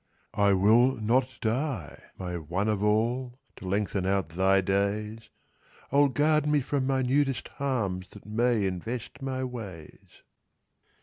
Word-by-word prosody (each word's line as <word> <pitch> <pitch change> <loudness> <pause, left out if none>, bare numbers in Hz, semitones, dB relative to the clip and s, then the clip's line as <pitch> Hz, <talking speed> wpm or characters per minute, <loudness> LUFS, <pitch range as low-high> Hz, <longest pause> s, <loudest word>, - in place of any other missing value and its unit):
"I 100 -1 +3
will 115 +7 +4
not 125 +4 0
die, 115 - -2 0.2
my 90 -1 -4
One 85 +5 -2
of 105 -2 0
all!— 120 +4 0 0.2
To 95 - -8
lengthen 100 -1 -1
out 95 -3 0
thy 95 +3 +3
days 100 +3 -1 0.6
I'll 140 +1 +5
guard 150 +2 +2
me 150 0 +3
from 135 0 -1
minutest 135 0 +1
harms 100 -10 -1
That 105 - -14
may 115 0 +1
invest 115 - -5
my 130 -1 -3
ways!" 105 -11 -9
110 Hz, 130 wpm, -28 LUFS, 95-130 Hz, 0.6 s, I'll